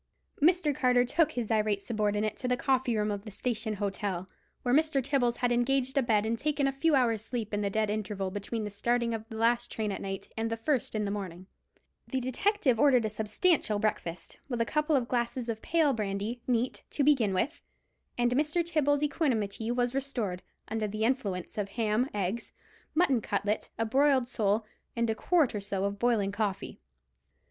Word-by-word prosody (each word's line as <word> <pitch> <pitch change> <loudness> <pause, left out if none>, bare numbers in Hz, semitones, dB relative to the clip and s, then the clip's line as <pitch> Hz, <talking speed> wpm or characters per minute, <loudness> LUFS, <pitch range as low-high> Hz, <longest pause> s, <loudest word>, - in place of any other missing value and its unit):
Mr. 325 -1 +4
Carter 250 -1 +3
took 300 +6 +2
his 240 -2 -3
irate 215 -2 +2
subordinate 210 0 -1
to 250 - -3
the 250 0 +1
coffee 255 -3 +1
room 210 0 +1
of 200 -1 -4
the 215 - -8
Station 220 0 -2
Hotel, 195 -2 -3 0.4
where 245 - +1
Mr. 310 -1 +3
Tibbles 260 -3 +1
had 245 0 0
engaged 260 +2 +1
a 275 - +4
bed 220 -4 +2
and 225 +1 -1
taken 295 -1 0
a 275 - +2
few 295 +3 +2
hours' 230 -5 +2
sleep 225 -3 -4
in 205 - 0
the 200 - 0
dead 215 +1 0
interval 205 -2 -3
between 205 +3 -4
the 210 - -4
starting 235 +3 0
of 225 0 -5
the 220 - -7
last 235 +2 +2
train 215 -2 -2
at - - -4
night 195 -1 -5
and 225 0 -1
the 225 - -2
first 245 0 -1
in 210 -1 0
the 200 - -2
morning. 185 -3 -5 0.6
The 265 - -1
detective 260 - +1
ordered 255 -5 +5
a 215 - -1
substantial 215 - +1
breakfast, 180 -5 -3
with 240 -3 -2
a 230 - +2
couple 300 +3 +1
of 250 -3 +1
glasses 240 0 -1
of 220 -1 -3
pale 315 -4 +2
brandy, 210 +2 -3
neat, 245 0 0
to 290 - 0
begin 265 -8 +4
with; 255 - -1 0.6
and 240 0 +2
Mr. 300 +6 +1
Tibbles' 295 -3 +1
equanimity 230 - 0
was 245 0 0
restored, 245 -10 -2 0.3
under 220 -1 -1
the 215 +1 -3
influence 215 -7 -1
of 200 -1 -2
ham, 225 +4 0
eggs, 205 +3 -3 0.4
mutton 280 -8 +3
cutlet, 205 +1 -1
a 225 - 0
broiled 265 +1 +3
sole, 215 -3 0 0.3
and 235 -1 +1
a - - +1
quart 315 +4 +2
or 210 - -3
so 195 -1 -2
of 200 0 -3
boiling 225 -5 +2
coffee. 205 -2 -3
230 Hz, 195 wpm, -29 LUFS, 210-265 Hz, 0.6 s, ordered